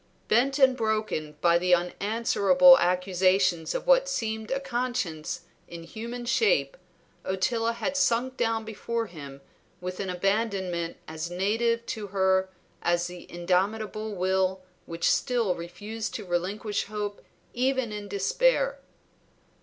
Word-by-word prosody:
Bent 270 +5 +3
and 265 -2 +5
broken 215 - -2
by 170 0 +4
the 180 0 +4
unanswerable 225 +8 +4
accusations 180 -1 +2
of - - -3
what - - +4
seemed 220 - -3
a 270 - 0
conscience 245 - -3 0.3
in 170 -1 -9
human 235 +7 -7
shape, 465 - +2 0.5
Ottila 225 +5 0
had 280 +4 -3
sunk 255 -1 +1
down 225 -2 0
before 230 +1 -3
him 140 -7 -10 0.4
with 180 0 -6
an 195 - -3
abandonment 190 -3 -1
as 160 +1 -5
native 225 +6 0
to 215 -3 -5
her 190 -1 +2 0.3
as 175 0 +1
the 175 0 -9
indomitable 205 +5 -1
will 190 0 +1 0.3
which 165 0 -1
still 235 -7 +2
refused 205 +6 -6
to 210 - -5
relinquish 190 +4 -2
hope 205 -1 -5 0.3
even 260 -1 0
in 210 -1 -6
despair. - - +1
205 Hz, 125 wpm, -27 LUFS, 180-235 Hz, 0.5 s, and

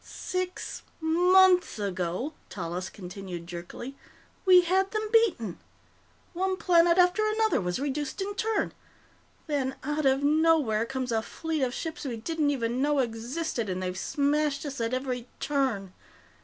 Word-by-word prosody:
"Six 365 0 -4 0.2
months 360 +2 +4
ago," 190 - -2 0.2
Tallis 180 0 -4
continued 185 -3 -8
jerkily, 175 +10 -7 0.5
"we 365 -1 +9
had 380 +2 +2
them 430 0 -3
beaten. 360 - +2 0.7
One 375 +2 0
planet 340 -1 +4
after 360 +3 +4
another 435 - +2
was 180 -1 -1
reduced 280 0 -3
in 395 +1 -2
turn. 435 0 -1 0.7
Then, 275 -4 -1
out 295 +1 0
of 270 +1 +2
nowhere, 295 -7 +3
comes 260 -1 -3
a 225 -1 +1
fleet 320 +6 -3
of 255 -2 +1
ships 325 0 -5
we 250 -5 -3
didn't 305 +5 0
even 245 -2 -1
know 295 +1 +2
existed, 240 0 -2
and 185 0 -2
they've 180 0 -3
smashed 290 +6 0
us 275 -4 -4
at 230 +2 0
every 255 -2 -3
turn." 255 -10 -1
280 Hz, 140 wpm, -28 LUFS, 225-340 Hz, 0.7 s, we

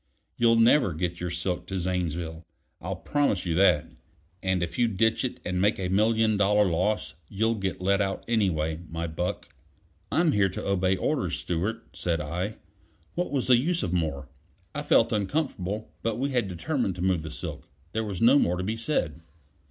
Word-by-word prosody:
You'll 115 -1 +4
never 115 - +5
get 85 +2 -3
your 90 - -3
silk 90 +1 -2
to 95 - -3
Zanesville, 85 -2 -2 0.4
I'll - - -3
promise 140 -11 0
you 85 - 0
that. 90 -3 +4 0.6
And 95 -2 +1
if 85 - -4
you 120 - +4
ditch 110 +3 +1
it 130 - -3
and 90 0 -1
make 105 +2 +3
a 95 -2 -2
million 110 +2 +3
dollar 105 +1 +4
loss, 95 +4 0 0.2
you'll 110 +3 +1
get 95 -4 -3
let 100 +2 +2
out 95 -1 -2
anyway, 80 -9 +1
my 85 0 -3
buck." 85 +2 -3 0.6
"I'm 165 -1 +3
here 100 -6 +3
to 90 - -5
obey 95 -1 +2
orders, - - 0
Stewart," 105 +7 -3
said 85 -2 -1
I. 90 +8 -3 0.6
What 175 +1 -1
was 135 -3 -1
the 125 -2 +6
use 170 +7 0
of 90 -2 -2
more? 75 -6 -1 0.5
I 145 - -3
felt 115 -5 +3
uncomfortable; 105 - -2
but 115 -1 -1
we 140 +3 -1
had 120 -5 +1
determined 95 - -1
to 90 - -4
move 95 -3 +2
the 80 - -6
silk; 75 - -7 0.2
there 110 +2 -1
was 100 -2 -3
no 130 +5 +7
more 90 -7 +1
to 90 - -2
be 110 +4 -2
said. 100 - -1
95 Hz, 185 wpm, -27 LUFS, 90-115 Hz, 0.6 s, no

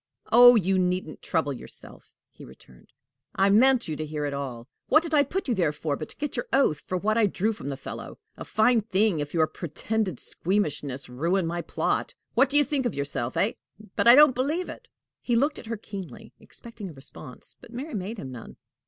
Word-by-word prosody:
"Oh, 245 +1 +9
you 190 -2 +2
needn't 180 -3 -2
trouble 145 -3 -1
yourself!" 125 - -12 0.2
he - - -14
returned. 65 -1 -17 0.4
"I 195 +1 +3
meant 250 +4 +4
you 155 - -3
to 155 - -3
hear 150 -1 -4
it 145 - -3
all. 130 -4 -5 0.2
What 310 +3 +5
did 330 -2 -5
I 290 -2 +5
put 370 +7 -4
you 250 - +1
there 175 -8 +1
for, 150 0 -3
but 155 - -7
to - - -10
get 295 0 -4
your - - -3
oath 215 - +2
to 185 - -1
what 215 +4 +1
I 215 - +4
drew 210 +3 -1
from 140 - -7
the 135 - -4
fellow? 135 - -8 0.2
A - - -8
fine 225 +2 +3
thing 200 -4 +1
if 145 +2 -4
your 160 -1 +4
pretended 180 - -3
squeamishness 150 -8 -2
ruin 170 +9 0
my 170 +1 -2
plot! - - -2 0.2
What 265 +3 +4
do 290 - +5
you 295 - +8
think 275 -3 -1
of 235 - -5
yourself, 140 -3 -3
hey? - - +1 0.4
But - - +1
I 240 - +10
don't 295 -1 +7
believe 295 +8 -1
it." 485 - -10 0.3
He 240 - 0
looked 285 +6 +1
at - - -11
her 230 0 -3
keenly, 205 +1 -9
expecting 230 -4 -10
a - - -10
response, 135 -1 -6
but - - -14
Mary 265 +6 -6
made 210 +2 -4
him 135 -9 -7
none. 120 -3 -10
195 Hz, 215 wpm, -26 LUFS, 150-240 Hz, 0.4 s, I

